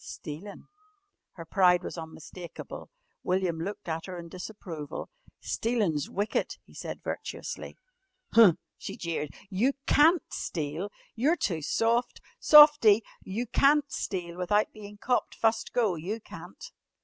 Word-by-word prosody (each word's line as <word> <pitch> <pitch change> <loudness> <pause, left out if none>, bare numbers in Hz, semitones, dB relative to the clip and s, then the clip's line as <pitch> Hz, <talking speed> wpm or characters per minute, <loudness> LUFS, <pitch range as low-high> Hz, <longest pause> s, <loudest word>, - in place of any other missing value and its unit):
"Stealin'." 165 +7 -8 0.7
Her 165 - -9
pride 180 0 +4
was - - -5
unmistakable. 165 +1 -9 0.3
William 180 -3 0
looked 200 +4 -5
at 165 +1 -3
her 185 -1 -6
in 170 -1 -8
disapproval. 180 - -7 0.3
"Stealin's 210 - -1
wicked," 205 +2 -1
he - - -19
said - - -7
virtuously. - - -6 0.6
"Huh!" 220 -6 +8 0.3
she - - -6
jeered, 165 -3 -3 0.2
"you 235 +9 +2
can't 320 +4 +5
steal! 160 +4 -3 0.2
You're 290 +9 +2
too 170 - -1
soft! 230 +10 +1 0.2
Softie! 295 -8 +8 0.2
You 220 +6 -3
can't 280 +4 +3
steal 175 -3 -4
without 205 +4 +1
bein' 210 -1 -11
copped 245 +4 0
fust 225 0 +1
go, 225 -6 +2
you 180 +7 -4
can't." 485 - -11
200 Hz, 125 wpm, -28 LUFS, 170-230 Hz, 0.7 s, Huh